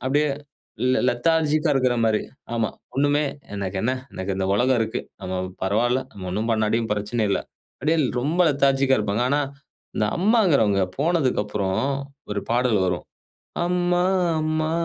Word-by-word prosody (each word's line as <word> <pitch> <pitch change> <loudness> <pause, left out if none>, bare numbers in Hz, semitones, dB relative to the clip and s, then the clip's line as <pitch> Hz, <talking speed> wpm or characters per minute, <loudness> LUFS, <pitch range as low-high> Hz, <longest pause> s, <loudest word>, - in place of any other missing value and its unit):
அப்படியே 145 +3 +2 0.5
லெ 125 - +2
லெ - - +2
லெதார்ஜிக்கா 155 +4 +2
இருக்குற 130 -2 +2
மாரி 110 -1 +2 0.3
ஆமா, 115 -2 +1 0.3
ஒண்ணுமே 145 +2 +2 0.3
"எனக்கென்ன, 100 +5 -1 0.2
எனக்கு 95 +1 -3
இந்த 95 - -1
உலகம் 125 +2 +3
இருக்கு, 110 +1 -1 0.2
நம்ம 95 - -4 0.3
பரவால்லை, 120 +7 +1
நம்ம 95 -2 -7
ஒண்ணும் 110 +5 -1
பண்ணாட்டியும் 110 +1 0
பிரச்சனை 105 +2 -1
இல்லை" - - +1 0.4
அப்டியே 155 +4 +2 0.2
ரொம்ப 155 +8 0
லெதார்ஜிக்கா 135 -1 +3
இருப்பாங்க. 105 +3 0
ஆனா 145 +1 +2 0.6
இந்த 105 - +2
அம்மாங்கிறவங்க 170 - +3 0.2
போனதுக்கு 150 -7 +2
அப்புறம் 100 -2 -2 0.5
ஒரு 100 -1 -1
பாடல் 120 -3 +2
வரும், 90 -1 -2 0.6
“அம்மா, 175 0 +1 0.4
அம்மா, 155 0 0
125 Hz, 135 wpm, -23 LUFS, 105-150 Hz, 0.6 s, உலகம்